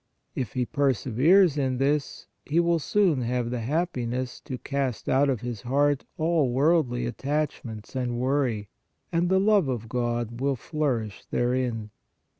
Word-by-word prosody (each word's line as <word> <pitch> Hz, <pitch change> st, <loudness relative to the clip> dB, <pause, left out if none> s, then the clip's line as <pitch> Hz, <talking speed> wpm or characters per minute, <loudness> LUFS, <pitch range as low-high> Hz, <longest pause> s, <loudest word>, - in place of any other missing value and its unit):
If 125 Hz, -7 st, -4 dB
he 125 Hz, -1 st, 0 dB
perseveres 145 Hz, -, +3 dB
in 130 Hz, -2 st, 0 dB
this, 140 Hz, +2 st, 0 dB, 0.2 s
he 160 Hz, +4 st, +1 dB
will 170 Hz, -1 st, +3 dB
soon 175 Hz, -4 st, +2 dB
have 120 Hz, 0 st, -1 dB
the 125 Hz, -, -2 dB
happiness 130 Hz, -3 st, -2 dB
to 130 Hz, -, -4 dB
cast 135 Hz, -3 st, -3 dB
out 140 Hz, +2 st, +3 dB
of 125 Hz, -5 st, -1 dB
his 120 Hz, -4 st, -5 dB
heart 140 Hz, +2 st, +1 dB
all 160 Hz, -5 st, +2 dB
worldly 135 Hz, -3 st, +2 dB
attachments 130 Hz, -4 st, -3 dB
and 125 Hz, -2 st, -1 dB
worry, 125 Hz, -5 st, 0 dB, 0.4 s
and 175 Hz, +1 st, +1 dB
the 190 Hz, 0 st, +4 dB
love 200 Hz, -5 st, +4 dB
of 120 Hz, -4 st, -3 dB
God 120 Hz, 0 st, -2 dB
will 140 Hz, 0 st, +1 dB
flourish 125 Hz, -7 st, -2 dB
therein." 120 Hz, -3 st, -1 dB
130 Hz, 145 wpm, -26 LUFS, 120-150 Hz, 0.4 s, the